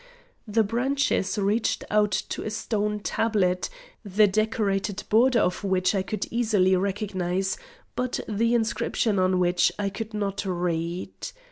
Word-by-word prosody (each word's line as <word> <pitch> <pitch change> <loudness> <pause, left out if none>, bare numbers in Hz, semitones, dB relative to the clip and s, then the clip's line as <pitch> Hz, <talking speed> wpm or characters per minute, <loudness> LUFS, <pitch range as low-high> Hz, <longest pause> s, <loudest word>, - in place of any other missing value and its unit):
The 220 +1 +2
branches 240 -3 0
reached 205 +3 +1
to 210 -2 +1
a - - -3
stone 210 -1 -2
tablet, 195 -5 0 0.3
the 210 +1 +4
decorated 205 -1 0
border 240 +3 +4
of 180 -3 +1
which 185 -1 +1
I 195 - +1
could 200 +1 -3
easily 210 -6 +3
recognise, 190 -1 -1 0.4
but 255 0 -1
the 230 +3 +1
inscription 220 -2 0
on 185 0 +2
which 175 -1 +3
I 200 -1 -1
could 215 +2 -6
not 200 -1 -2
read. 175 -2 -2
205 Hz, 130 wpm, -26 LUFS, 185-220 Hz, 0.4 s, the